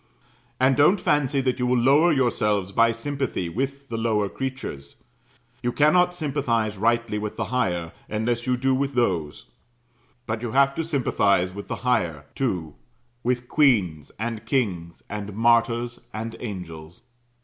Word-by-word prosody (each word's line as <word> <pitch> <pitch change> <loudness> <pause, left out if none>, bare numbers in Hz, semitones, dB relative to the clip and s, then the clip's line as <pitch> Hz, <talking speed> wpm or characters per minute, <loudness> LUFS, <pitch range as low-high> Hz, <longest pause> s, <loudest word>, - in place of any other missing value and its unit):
And 130 +1 +4
don't 165 +9 +5
fancy 145 -5 +1
that 130 -1 -1
you 125 - +1
will 125 0 +3
lower 140 +8 +5
yourselves 105 -8 +1
by 115 +3 +4
sympathy 125 -6 -3
with 135 +7 -3
the 115 - -3
lower 105 -3 +1
creatures; 130 - -6 0.7
you 120 - 0
cannot 180 +6 +3
sympathize 130 -9 -1
rightly 115 +1 +1
with 105 0 -5
the - - -1
higher, 85 -9 0 0.2
unless 115 +2 -1
you 125 0 +2
do 130 +1 +1
with 135 +1 -1
those: 90 -11 0 0.8
but 110 0 -3
you 120 -2 -4
have 140 0 +4
to 165 - -2
sympathize 100 - +1
with 100 +1 -8
the - - -3
higher, 85 - 0
too 90 - -2 0.5
with 120 0 -1
queens, 100 - +2
and 110 0 -4
kings, 90 - -1
and 105 -1 -6
martyrs, 115 +1 +2
and 115 +1 -5
angels. 90 -2 -8
120 Hz, 150 wpm, -24 LUFS, 100-135 Hz, 0.8 s, don't